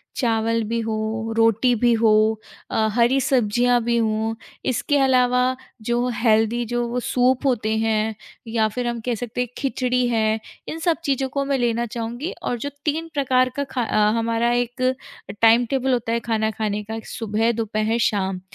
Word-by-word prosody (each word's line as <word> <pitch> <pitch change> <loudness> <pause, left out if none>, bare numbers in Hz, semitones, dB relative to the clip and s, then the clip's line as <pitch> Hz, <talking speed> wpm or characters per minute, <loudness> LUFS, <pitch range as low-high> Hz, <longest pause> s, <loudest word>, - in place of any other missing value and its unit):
चावल 230 -2 +1
भी 230 0 0
हो, 220 0 -3
रोटी 225 +2 +3
भी 240 +2 +2
हो 225 -1 +3 0.6
अ, 220 - +2
हरी 240 +4 +3
सब्ज़ियाँ 245 -1 +2
भी 235 0 +1
हों। 220 0 0 0.4
इसके 270 +3 +1
अलावा, 255 -1 +3 0.3
जो 240 +2 0
हेल्दी 225 +1 +2
जो 240 +1 -1
वो 240 +1 -2
सूप 250 +2 +1
होते 240 -5 +1
हैं, 220 0 0 0.3
या 225 -1 +1
फिर 240 +3 -3
हम 235 -1 -2
कह 245 -2 0
सकते 240 +2 -4
हैं, 250 - -1
खिचड़ी 250 -2 0
है, 220 -2 +1 0.3
इन 320 - -5
सब 330 0 +1
चीज़ों 270 -2 0
को 280 +1 -1
मैं 275 0 0
लेना 235 -1 0
चाहूँगी 240 - -4
और 245 - -1
जो 285 - -3 0.2
3 320 +2 -1
प्रकार 255 -3 +2
का 285 - -1
खा 250 - -1
अ, 210 -1 +2
हमारा 230 +1 +1
एक 245 +1 -2 0.6
टाइम-टेबल 245 +3 +4
होता 235 -2 -1
है, 235 - +1
खाना 220 -1 0
खाने 210 -1 -2
का, 220 +2 -6
एक 225 - -7
सुबह, 225 0 0
दोपहर, 220 0 -1
शाम। 190 -3 -2
235 Hz, 175 wpm, -22 LUFS, 220-250 Hz, 0.6 s, टाइम-टेबल